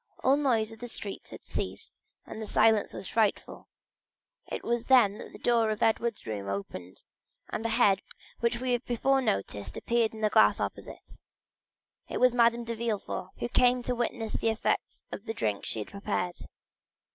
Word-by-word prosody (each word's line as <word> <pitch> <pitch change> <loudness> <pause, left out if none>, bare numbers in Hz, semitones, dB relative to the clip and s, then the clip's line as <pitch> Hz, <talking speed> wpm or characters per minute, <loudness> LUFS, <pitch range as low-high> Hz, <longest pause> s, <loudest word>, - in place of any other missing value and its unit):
All 265 +1 +5
noise 235 -7 +1
in 225 - -12
the 245 - -6
streets 205 -3 -5
had - - -10
ceased, - - -5 0.2
and 220 - -8
the 215 - -5
silence 220 0 +4
was - - -6
frightful. 220 -3 0 0.8
It - - -4
was 235 0 -1
then 225 -6 +5
that - - -9
the - - -11
door 230 -2 +2
of 215 0 -1
Edward's 225 0 +1
room 100 -3 -4
opened, 95 -2 -6 0.5
and 215 - -3
a 230 - 0
head 220 -4 +4 0.4
we 240 +2 0
have 245 0 +1
before 270 +3 +2
noticed 100 - -2
appeared 230 -2 +1
in 220 - -8
the 215 -1 +2
glass - - +5
opposite; - - -6 0.9
it - - -2
was 250 -1 +5
Madame 235 0 +4
de 230 0 -3
Villefort, 215 -5 -3
who - - -2
came 245 +1 +3
to 250 - 0
witness 235 -2 -2
the 225 - +1
effects 220 - -1
of 205 - -7
the 225 - -4
drink 105 - -1
she - - -3
had 105 - -4
prepared. 200 -3 -2
225 Hz, 180 wpm, -29 LUFS, 200-240 Hz, 0.9 s, All